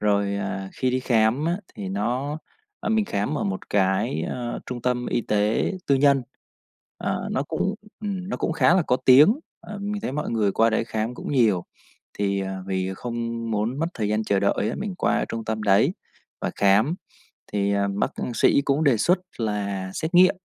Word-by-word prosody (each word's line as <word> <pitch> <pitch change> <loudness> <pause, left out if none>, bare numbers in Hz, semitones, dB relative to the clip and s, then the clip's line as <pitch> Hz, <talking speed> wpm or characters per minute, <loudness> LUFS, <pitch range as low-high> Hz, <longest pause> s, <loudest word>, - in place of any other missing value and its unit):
Rồi, 100 -1 +1
à, 95 -1 -4
khi 130 - 0
đi 130 +1 0
khám 120 +2 +2
á 175 +2 +1 0.2
thì 95 -2 -5
nó, 125 +10 -2 0.4
ờ, - - -3
mình 220 -1 +3
khám 130 - -1
ở - - -1
một 95 -1 -4
cái, 95 -5 +1
ờ, 120 +7 -4
trung 125 -2 -5
tâm 125 -1 0
y 120 - 0
tế 105 - +1
tư 140 - +4
nhân. 140 -1 +4 0.8
Ờ, - - -2
nó 130 - 0
cũng, 165 +7 -1 0.3
ừm, 195 -3 -4
nó - - -2
cũng - - -1
khá 165 +1 +4
là 185 - +4
có 125 - +1
tiếng, 150 - +7 0.2
ờ, 210 -1 -8
mình 205 +1 -4
thấy - - -3
mọi 150 +2 -2
người 105 -4 +1
qua 115 +3 +3
đấy 110 - +1
khám 110 +1 -3
cũng 125 - -5
nhiều. 110 -9 +3 0.5
Thì, 100 -1 0
à, 95 0 -4
vì 95 0 -2
không 115 +1 -4
muốn 110 +5 -1
mất 165 - +1
thời 105 -3 -1
gian 105 +1 0
chờ 100 -2 +1
đợi 100 +1 +1
á, - - -4
mình 205 -3 -3
qua - - +1
trung 115 -1 -4
tâm 110 0 -3
đấy 105 - +4 0.5
và - - -1
khám 105 - +4 0.6
thì, 100 -1 +1
à, 100 0 +1
bác 100 - -1
cũng 120 - -4
sĩ 140 - +4
cũng 145 +3 +1
đề 135 -5 +4
xuất 175 - +3 0.2
là 100 -4 -2
xét 160 +3 -3
nghiệm 185 +2 +6
115 Hz, 205 wpm, -24 LUFS, 100-145 Hz, 0.8 s, tiếng